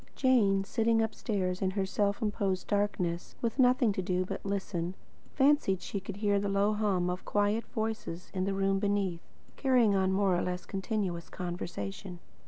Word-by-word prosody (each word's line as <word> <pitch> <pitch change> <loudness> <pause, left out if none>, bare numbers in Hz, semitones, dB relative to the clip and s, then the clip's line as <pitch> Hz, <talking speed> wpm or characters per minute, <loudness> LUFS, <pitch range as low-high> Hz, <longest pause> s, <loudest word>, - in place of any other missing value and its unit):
Jane, 210 -7 +3
sitting 225 +2 +1
upstairs 205 -4 -1
in 190 - +2
her 195 - +2
self 200 +3 0
imposed 200 -3 -1
darkness, 185 -4 -1
with 235 +3 -2
nothing 250 -3 +4
to 190 - -2
do 185 0 0
but - - -5
listen, 190 -3 -2 0.4
fancied 275 -9 +3
she 200 - -3
could 195 0 -7
hear 205 -1 +1
the 200 0 -1
low 200 +2 +2
hum 200 -4 +1
of 180 +1 -3
quiet 205 +2 +1
voices 220 -6 -4
in 185 -1 -1
the 195 - 0
room 195 0 +1
beneath, 200 -4 0 0.4
carrying 250 -6 +4
on 190 -1 +2
a - - +1
more 195 -1 +3
or 175 - +1
less 180 0 -3
continuous 190 -3 -3
conversation. 175 - -5
195 Hz, 175 wpm, -30 LUFS, 185-215 Hz, 0.4 s, nothing